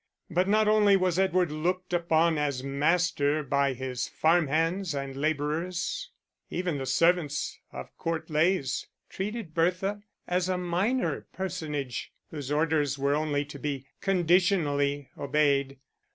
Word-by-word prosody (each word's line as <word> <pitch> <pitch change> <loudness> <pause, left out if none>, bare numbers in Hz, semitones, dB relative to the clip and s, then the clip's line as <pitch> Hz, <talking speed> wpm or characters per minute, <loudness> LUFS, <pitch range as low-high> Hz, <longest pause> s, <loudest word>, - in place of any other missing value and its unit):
But 180 +3 +2
not 215 +1 +3
only 210 -2 +5
was 185 -1 +1
Edward 185 -3 +2
looked 180 +4 -2
upon 165 -2 +2
as 140 -3 -1
master 150 +1 +1
by 140 0 +1
his 130 -1 -3
farm 165 0 +2
hands 165 +4 0
and 140 -1 -4
labourers; 160 - -2 0.4
even 175 -5 -2
the 135 - -4
servants 165 -3 +1
of - - -9
Court 165 -1 -2
Leys 155 -3 +1 0.2
treated 205 -3 -4
Bertha 185 +5 0 0.3
as 180 +1 0
a 185 - +1
minor 180 +9 -1
personage 155 -9 -4 0.2
whose 145 -3 -5
orders 150 -2 +1
were 140 +1 +1
only 145 -1 0
to 140 0 -10
be 140 -2 -3
conditionally 170 -7 +2
obeyed. 140 -1 +1
160 Hz, 130 wpm, -28 LUFS, 145-180 Hz, 0.4 s, only